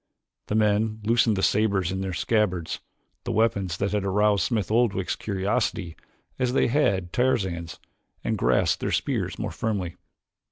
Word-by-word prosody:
The 105 Hz, -, -1 dB
men 110 Hz, 0 st, +2 dB
loosened 115 Hz, 0 st, +3 dB
the 95 Hz, -, -2 dB
sabers 100 Hz, -4 st, +2 dB
in 95 Hz, 0 st, -3 dB
their 95 Hz, -1 st, -2 dB
scabbards, 90 Hz, -2 st, 0 dB, 0.4 s
the -, -, -3 dB
weapons 100 Hz, -6 st, +1 dB
that 100 Hz, +1 st, -1 dB
had 105 Hz, -1 st, 0 dB
aroused 100 Hz, +1 st, +2 dB
Smith 105 Hz, -5 st, -1 dB
Oldwick's 110 Hz, -5 st, +1 dB
curiosity 95 Hz, -4 st, -1 dB, 0.4 s
as 125 Hz, -1 st, +1 dB
they 130 Hz, -, +3 dB
had 100 Hz, -, +1 dB
Tarzan's, 95 Hz, -10 st, 0 dB, 0.4 s
and -, -, 0 dB
grasped -, -, +2 dB
their -, -, -1 dB
spears -, -, -1 dB
more -, -, -3 dB
firmly. 100 Hz, -6 st, -3 dB
100 Hz, 150 wpm, -25 LUFS, 95-110 Hz, 0.4 s, loosened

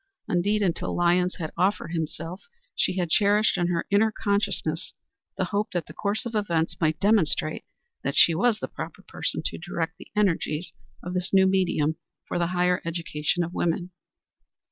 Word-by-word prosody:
Indeed, 205 Hz, +4 st, +1 dB
until 175 Hz, -4 st, -1 dB
Lyons 175 Hz, +1 st, +2 dB
had 160 Hz, -3 st, -5 dB
offered 185 Hz, +2 st, +1 dB
himself 165 Hz, +2 st, -4 dB, 0.3 s
she 185 Hz, -, +1 dB
had 175 Hz, -3 st, -1 dB
cherished 210 Hz, +2 st, +4 dB
in 175 Hz, -2 st, +1 dB
her 170 Hz, -1 st, 0 dB
inner 215 Hz, +2 st, +4 dB
consciousness 205 Hz, -1 st, -1 dB, 0.4 s
the -, -, +1 dB
hope 205 Hz, +1 st, +1 dB
that 175 Hz, -4 st, -1 dB
the -, -, -11 dB
course 205 Hz, +4 st, -1 dB
of 235 Hz, -, -4 dB
events 170 Hz, -6 st, 0 dB
might 155 Hz, -1 st, +2 dB
demonstrate 190 Hz, -7 st, +2 dB, 0.4 s
that 140 Hz, -, -1 dB
she 170 Hz, -, +7 dB
was 225 Hz, +6 st, +2 dB
the -, -, -4 dB
proper -, -, -8 dB
person -, -, -3 dB
to -, -, -3 dB
direct 165 Hz, -1 st, -3 dB
the -, -, -11 dB
energies 180 Hz, -5 st, 0 dB, 0.3 s
of 180 Hz, -, -5 dB
this 180 Hz, +1 st, -1 dB
new 190 Hz, -1 st, +6 dB
medium 180 Hz, -5 st, +2 dB, 0.3 s
for -, -, -2 dB
the 170 Hz, -, +2 dB
higher 180 Hz, 0 st, +1 dB
education 165 Hz, 0 st, -1 dB
of 170 Hz, +1 st, -5 dB
women. 175 Hz, +1 st, -1 dB
180 Hz, 170 wpm, -26 LUFS, 165-200 Hz, 0.4 s, she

